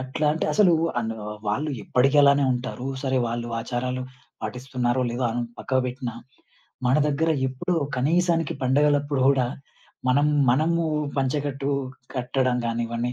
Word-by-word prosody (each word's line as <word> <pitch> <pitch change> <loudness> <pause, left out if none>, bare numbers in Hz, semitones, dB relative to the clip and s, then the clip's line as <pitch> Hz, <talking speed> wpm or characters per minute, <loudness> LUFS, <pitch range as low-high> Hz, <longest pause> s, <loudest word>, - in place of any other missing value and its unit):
అట్లా 130 +4 -2
అంటే 160 - -2
అసలు 185 0 +5 0.3
అను 115 -1 -3 0.3
వాళ్ళు 145 +9 -1
ఎప్పడికి 135 +3 +2
అలానే 140 0 +5
ఉంటారు. 125 +1 -4 0.2
సరే 130 -1 0
వాళ్ళు 120 0 -3
ఆచారాలు 125 +2 -3 0.4
పాటిస్తున్నారో 125 +2 -2
లేదో 120 +1 -2
అన్ 120 +1 -2 0.2
పక్కకి 130 -1 0
బెట్టిన 125 -1 -4 0.8
మన 125 - +3
దగ్గర 160 +3 +1 0.2
ఎప్పుడూ 175 +8 -2 0.2
కనీసానికి 165 +4 +1
పండుగలప్పుడు 145 +1 +2
గూడా 135 -3 +4 0.6
మనం 145 +3 +4 0.2
మనము 165 +6 +2 0.3
పంచెకట్టు 140 +1 -1 0.5
కట్టడం 125 0 0
గానివన్ని 115 +1 -2
130 Hz, 125 wpm, -24 LUFS, 125-145 Hz, 0.8 s, అసలు